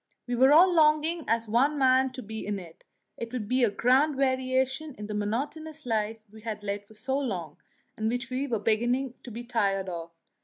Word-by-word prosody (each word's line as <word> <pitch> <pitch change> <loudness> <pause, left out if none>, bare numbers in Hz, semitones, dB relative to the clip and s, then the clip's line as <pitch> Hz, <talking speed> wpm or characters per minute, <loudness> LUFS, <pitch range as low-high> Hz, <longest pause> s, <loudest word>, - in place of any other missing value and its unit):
We 245 - -3
were 260 +3 +5
all 350 +4 +7
longing 315 +1 +3
as 230 0 +1
one 265 +7 +2
man 260 -1 +4
to 255 - -7
be 220 +1 -6
in 205 0 -2
it; 170 -4 -12 0.3
it 230 0 -6
would 240 -5 -4
be 255 +2 +2
a 235 - +5
grand 260 +8 +3
variation 265 +2 0
in 210 - -6
the 210 - -5
monotonous 290 +9 -3
life 220 -1 -1
we 220 0 -13
had 215 -2 -5
led 200 0 -4
for 220 - -17
so 265 +5 -1
long, 190 - -4 0.4
and 220 0 -1
which 245 +1 -3
we 265 +3 -1
were 235 -4 0
beginning 240 +4 +1
to - - -10
be 235 +1 -6
a - - -9
little 240 - -19
tired 195 -4 +1
of. 170 -1 -6
245 Hz, 220 wpm, -28 LUFS, 215-270 Hz, 0.4 s, all